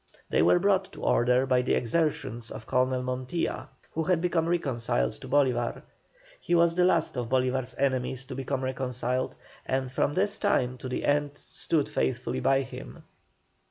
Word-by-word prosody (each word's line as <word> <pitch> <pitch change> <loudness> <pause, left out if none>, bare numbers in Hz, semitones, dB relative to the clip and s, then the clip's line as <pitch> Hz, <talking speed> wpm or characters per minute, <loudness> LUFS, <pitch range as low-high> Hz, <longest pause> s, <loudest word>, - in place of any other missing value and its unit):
They - - +3
were 90 +2 +5
brought 195 -1 +2
to 150 - -10
order 125 +2 +3
by 130 -1 +3
the 125 - +1
exertions 120 -3 -1
of 110 +1 -8
Colonel 130 +1 +1
Montilla, 130 +6 -3 0.2
who 160 0 -2
had 180 0 +2
become 170 -1 +1
reconciled 120 - 0
to - - -9
Bolívar. 125 -4 +1 0.6
He 175 - 0
was 170 0 +4
the 180 +1 +3
last 170 -5 +2
of 120 -2 -2
Bolívar's 130 0 0
enemies 130 -1 -1
to 130 - -7
become 135 0 -3
reconciled, 130 -1 -2 0.3
and 130 -1 -2
from 145 +3 0
this 200 +2 0
time 125 - +1
to 130 - -6
the 125 - -2
end 145 0 +1
stood 150 -1 -2
faithfully 125 -1 -1
by 135 0 +3
him. 130 - -10
130 Hz, 165 wpm, -28 LUFS, 125-155 Hz, 0.6 s, were